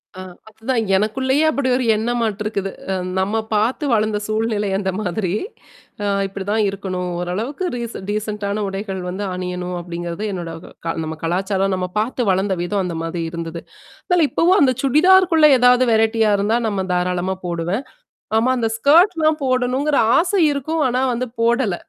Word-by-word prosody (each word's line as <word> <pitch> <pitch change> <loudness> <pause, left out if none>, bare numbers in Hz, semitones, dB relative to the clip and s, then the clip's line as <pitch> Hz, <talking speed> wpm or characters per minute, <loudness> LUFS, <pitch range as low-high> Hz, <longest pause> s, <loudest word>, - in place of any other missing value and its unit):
அ - - -9 0.3
அதுதான் 225 +2 -2
எனக்குள்ளேயே 260 +8 +1
அப்படி 275 -3 -1
ஒரு 255 - -1
எண்ணமாட்டுருக்குது. 215 -3 -2 0.2
அ - - +1 0.3
நம்ம 205 +4 0 0.2
பார்த்து 235 +7 0
வளர்ந்த 215 -1 +1
சூழ்நிலை 215 -2 -1
அந்த 190 -1 -1
மாதிரி. 180 -1 -2 0.7
அ - - -1 0.2
இப்படிதான் 200 +3 -1
இருக்கணும். 185 -2 -4
ஓரளவுக்கு 220 - -3
ரீசன் 235 -5 -6
டீசென்ட்டான 210 -1 -2
உடைகள் 195 -1 -4
வந்து 195 +3 -4
அணியணும் 180 0 -4
அப்படிங்கிறது 175 +2 -5
என்னோட 170 -2 -5 0.3
க - - -3 0.2
நம்ம 160 0 -5
கலாச்சாரம், 190 +3 0
நம்ம 180 0 -2
பார்த்து 240 0 -1
வளர்ந்த 190 +1 0
விதம் 195 +1 -1
அந்த 170 -2 -4
மாதிரி 165 0 -3
இருந்தது. 170 0 -5 0.5
அதனால 345 -4 +3
இப்பவும் 365 +4 +3
அந்த 260 -2 +4
சுடிதார்குள்ள 330 +3 +5
ஏதாவது 250 +1 +5
வெரைட்டியா 220 -1 +3
இருந்தா 215 +4 +1
நம்ம 195 -3 -1
தாராளமா 180 +1 -1
போடுவேன். 175 +8 -2 0.5
ஆமா, 240 +3 +2
அந்த 225 -2 0
ஸ்கர்ட்லாம் 315 - +4
போடணுங்கிற 255 +3 +1 0.2
ஆசை 370 +2 +1
இருக்கும். 310 +3 -2
ஆனா 250 +2 0
வந்து 250 +2 -2
போடல. 235 -5 +2
215 Hz, 145 wpm, -20 LUFS, 190-255 Hz, 0.7 s, சுடிதார்குள்ள